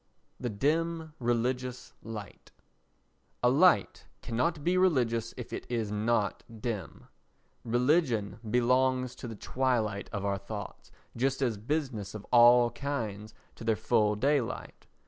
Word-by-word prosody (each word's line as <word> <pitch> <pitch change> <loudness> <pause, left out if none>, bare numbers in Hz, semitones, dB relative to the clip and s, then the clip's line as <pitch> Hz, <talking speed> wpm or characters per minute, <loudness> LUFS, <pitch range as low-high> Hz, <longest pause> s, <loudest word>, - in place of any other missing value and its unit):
The 125 - -2
Dim 160 +7 -1
Religious 125 +1 -1
Light 105 -3 -9 0.9
A 125 - +5
light 145 - +3 0.2
cannot 145 +6 -1
be 175 +3 +2
religious 120 -11 +2
if 125 - -7
it - - -5
is 115 -4 -1
not 105 -1 0 0.2
dim. 105 -8 -5 0.6
Religion 120 -3 +1
belongs 125 +1 +2
to 125 - -8
the 115 - -6
twilight 110 -3 -1
of 100 -1 -3
our 100 -1 0
thoughts, 100 0 -8 0.2
just 135 +3 0
as 120 -4 +1
business 120 -4 -3
of 105 - -7
all 120 0 +7
kinds 110 -7 -4 0.2
to - - -11
their 110 -1 +2
full 105 0 +2
daylight. 135 +2 -1
120 Hz, 125 wpm, -30 LUFS, 110-130 Hz, 0.9 s, all